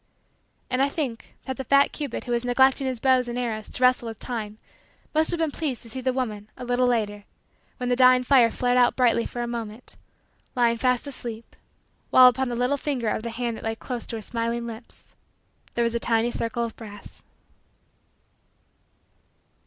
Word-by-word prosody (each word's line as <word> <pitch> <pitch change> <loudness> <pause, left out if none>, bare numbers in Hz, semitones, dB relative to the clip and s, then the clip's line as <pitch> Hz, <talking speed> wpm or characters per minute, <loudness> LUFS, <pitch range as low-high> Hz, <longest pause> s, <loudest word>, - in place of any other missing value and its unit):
And 255 +1 +1
I 275 - +3
think 275 -7 -4
that 260 -1 -4
the 265 - -4
fat 280 +2 +4
cupid 285 -6 -5
who 245 - -6
was 235 0 +1
neglecting 265 +2 +3
his 255 -3 -3
bow 260 +1 +4
and 240 0 -4
arrows 225 -3 -3
to 255 - -4
wrestle 250 -2 +4
with 225 -2 -7
time 215 -4 -5 0.6
must 315 +1 +3
have 345 - +1
been 325 -2 0
pleased 285 -5 -3
to 230 - -6
see 260 - -2
the 260 0 +1
woman, 215 -5 -4
a 250 - -7
little 245 +1 +2
later, 210 -4 -1 0.5
when 250 0 -3
the 245 - +3
dying 255 0 +6
fire 250 -3 +5
flared 245 +2 +1
out 245 -1 +4
brightly 235 -2 +2
for 240 - -4
a - - -3
moment, 230 0 -6 0.6
lying 235 -2 +3
fast 250 +1 +1
asleep, 235 -5 -7 0.5
while, 255 - +8
upon 250 +1 +2
the 240 - -3
little 250 +4 +1
finger 260 -6 -2
of 215 - -1
the 235 - -4
hand 230 0 -3
that - - -11
lay 225 0 -2
close 245 +1 -6
to 230 - -5
her 220 - -5
smiling 235 +1 -2
lips, 230 0 -10 0.6
there 235 - +2
was 230 0 0
a 235 - 0
tiny 230 0 +1
circle 235 +1 -2
of 230 -1 -5
brass. 205 -3 -11
245 Hz, 195 wpm, -25 LUFS, 230-255 Hz, 0.6 s, while